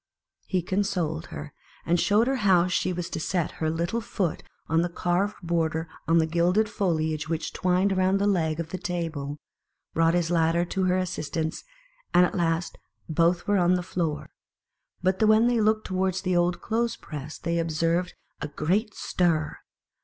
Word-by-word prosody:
He 185 -3 0
consoled 175 -4 -1
her, 150 0 -8 0.3
and 175 +1 +2
showed 210 +5 +3
her 265 +1 0
how 190 -6 +4
she 185 0 0
was 175 -1 -3
to - - -3
set 175 +1 -1
her 155 - +1
little 170 +8 -1
foot 195 -6 -2 0.3
on 165 0 +2
the 175 - 0
carved. 180 +4 0
border 165 -2 0 0.3
and 165 - +2
on - - +6
the 160 - +4
gilded 175 +6 +2
foliage 160 -6 -1
which 165 -1 -2
twined 185 +2 +2
around 185 +1 +2
the 200 - +1
leg 165 -6 +1
of 165 -1 -3
the 185 - -5
table, 165 -7 -3 0.6
brought 165 +1 +3
his 175 -1 +1
ladder 165 0 +2
to 190 +1 -1
her 185 0 +2
assistance, 160 -3 -3 0.5
and 180 0 +7
at - - -3
last 170 -1 -1 0.3
both 170 +2 +2
were 205 -1 +2
on 180 +1 +4
the 180 - -1
floor; 165 -4 -3 0.7
but 185 +2 +1
when 215 +1 +5
they 240 -2 +3
looked 215 0 +2
towards 185 0 -1
the 185 -2 +1
old 175 0 +1
clothes 230 +1 0
press, 150 0 -8
they 170 0 -1
observed 165 +2 0 0.3
a - - -2
great 190 +9 -1
stir. 165 -4 0
175 Hz, 175 wpm, -26 LUFS, 165-190 Hz, 0.7 s, and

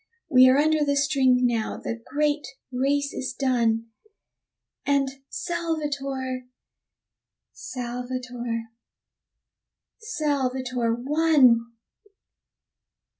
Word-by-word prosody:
We 255 -1 +8
are 260 - +5
under 310 +1 +3
the 285 -1 +1
string 270 -3 +3
now 230 -3 0
the 230 0 -5
great 295 0 0 0.2
race 280 +3 0
is 260 - -4
done, 230 -4 +1 0.9
And 280 -1 +2 0.2
Salvator, 285 -7 -3 1.1
Salvator, 245 -2 -5 1.3
Salvator 260 - -1
won! 255 -4 +3
260 Hz, 75 wpm, -25 LUFS, 245-290 Hz, 1.3 s, We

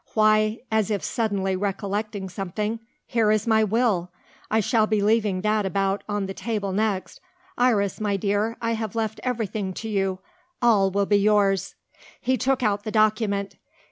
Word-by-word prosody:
"Why" 215 0 +3
as 220 -2 +1
if 205 -3 -1
suddenly 200 -5 -1
recollecting 200 +1 -3
something 205 +4 -3 0.3
"here 225 -3 +1
is 215 0 +2
my 220 -1 +4
will. 210 -5 +1 0.4
I 220 - +2
shall 220 +1 +2
be 215 -1 +1
leaving 205 -2 +2
that 215 +1 +1
about 195 +1 0
on 205 -1 -1
the 195 - -5
table 205 -1 -3
next. 195 -3 -2 0.3
Iris, 220 -5 +1
my 205 -2 0
dear, 205 +3 0
I 230 - +1
have 220 -2 -3
left 220 -1 -2
everything 220 -6 -2
to 225 - -5
you. 195 -2 0 0.4
All 215 -5 +4
will 200 +1 +1
be 205 +1 +3
yours." 200 -2 +2 0.4
He 260 +1 +1
took 255 +2 0
out 205 -2 +1
the 215 - -4
document. 215 -2 +1
210 Hz, 165 wpm, -24 LUFS, 195-220 Hz, 0.4 s, my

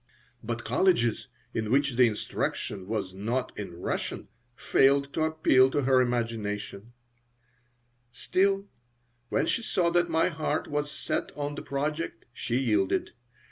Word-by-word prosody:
But 115 +1 -4
colleges 120 - +2 0.3
in 110 -1 -2
which 140 0 +2
the 125 0 +6
instruction 105 -2 -3
was 100 -4 -3
not 115 +7 -2
in 100 -4 -6
Russian - - -3 0.3
failed 140 +2 +3
to - - -1
appeal 155 -5 +4
to 145 +1 0
her 130 0 +4
imagination 115 -3 -3 1.2
Still, 195 +8 +1 0.6
when - - +1
she 230 - 0
saw 175 -6 +1
that 175 0 +2
my 165 +1 +2
heart 155 -2 -2
was 145 0 -2
set 140 - -3
on 145 0 -2
the - - -6
project, 150 -2 -3
she 120 0 -2
yielded. 105 -7 +1
130 Hz, 135 wpm, -28 LUFS, 115-150 Hz, 1.2 s, the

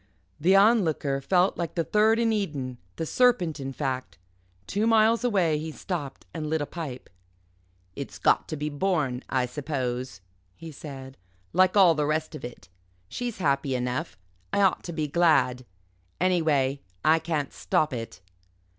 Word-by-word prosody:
The 180 +6 +4
Onlooker 180 -10 +3
fell 180 +6 +3
like 170 -2 -3
the 170 - +1
third 215 +5 +3
in 230 -1 +2
Eden 140 - -3 0.2
the 160 - -3
serpent, 185 -8 +2
in 135 0 -4
fact. 130 -4 -4 0.5
Two 210 - 0
miles 225 +1 +4
away 180 -10 +2
he 160 +1 -5
stopped 155 -5 -5
and 155 -2 -4
lit 160 0 +1
a 145 - -2
pipe. 145 -6 -7 0.9
"It's - - -7
got - - +2
to - - -4
be 150 +1 -3
borne, 145 -5 -1
I 130 -1 +1
suppose," 130 -4 -4 0.4
he 165 - -9
said, 135 -2 -9 0.4
"like 185 +2 +4
all 185 -4 +7
the 150 -2 0
rest 155 +1 -1
of 155 - -8
it. 120 -8 -9 0.4
She's 245 -3 -4
happy 140 -5 0
enough. 125 +5 -3 0.3
I - - +2
ought 190 - +2
to 175 - -5
be 155 -2 -2
glad. 140 -6 +2 0.5
Anyway, 155 -7 +1 0.2
I 160 +1 +5
can't 160 -3 -2
stop 155 -2 0
it." 115 -6 -6
155 Hz, 155 wpm, -26 LUFS, 135-185 Hz, 0.9 s, all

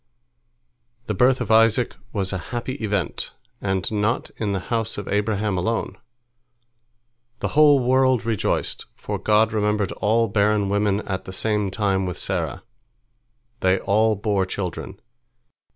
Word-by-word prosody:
The 105 - -2
birth 125 +6 +3
of 110 -3 -2
Isaac 115 +2 +4 0.2
was 100 -2 -2
a 95 - -2
happy 120 +2 -3
event, 100 -4 -2 0.3
and 95 -1 -1
not 110 +3 0
in 105 -2 -1
the 100 - -1
house 115 -1 -1
of 100 - -5
Abraham 105 -1 0
alone. 115 +5 -1 1.4
The - - -2
whole 150 -1 +6
world 130 -2 +2
rejoiced, 115 -4 -1
for - - -5
God 110 +1 +3
remembered 105 -2 0
all 115 +2 +1
barren 100 0 +2
women 100 0 +1
at 95 -2 -4
the 95 - -7
same 105 0 0
time 95 -1 0
with 90 - -4
Sarah. - - -2 1.0
They 95 +1 +3
all 110 +3 +2
bore 100 -2 0
children. 95 0 -5
105 Hz, 135 wpm, -23 LUFS, 100-115 Hz, 1.4 s, whole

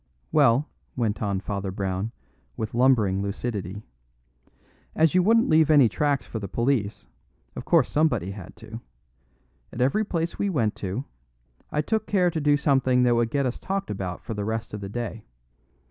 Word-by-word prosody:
"Well," 140 -1 +4 0.3
went 110 -4 -1
on 100 -3 -1
Father 100 -1 -3
Brown, 95 +2 -3 0.5
with 110 0 -4
lumbering 115 -6 +3
lucidity, 100 -1 -4 1.1
"as 160 -1 +3
you 185 - +5
wouldn't 225 +5 +4
leave 155 -1 +4
any 145 -5 +7
tracks 145 +4 0
for 110 - -5
the 100 - -5
police, 115 -2 -1 0.5
of - - -6
course - - +4
somebody 150 - +1
had 95 -3 -10
to. 110 +1 -10 0.9
At 115 - -8
every 135 +13 +2
place 170 -4 -3
we 205 - +1
went 115 - +1
to, 100 +8 -4 0.7
I 150 - +1
took 220 +5 -1
care 180 -3 +2
to 160 - -2
do 145 0 +4
something 130 -3 +2
that 120 -1 +4
would 115 -1 +1
get 140 +2 0
us 125 - -2
talked 195 +1 -3
about 95 -3 -5
for 115 - -5
the 105 -1 -3
rest 110 +1 -3
of 105 - -5
the 100 - -6
day. 115 0 -5
120 Hz, 175 wpm, -25 LUFS, 105-150 Hz, 1.1 s, any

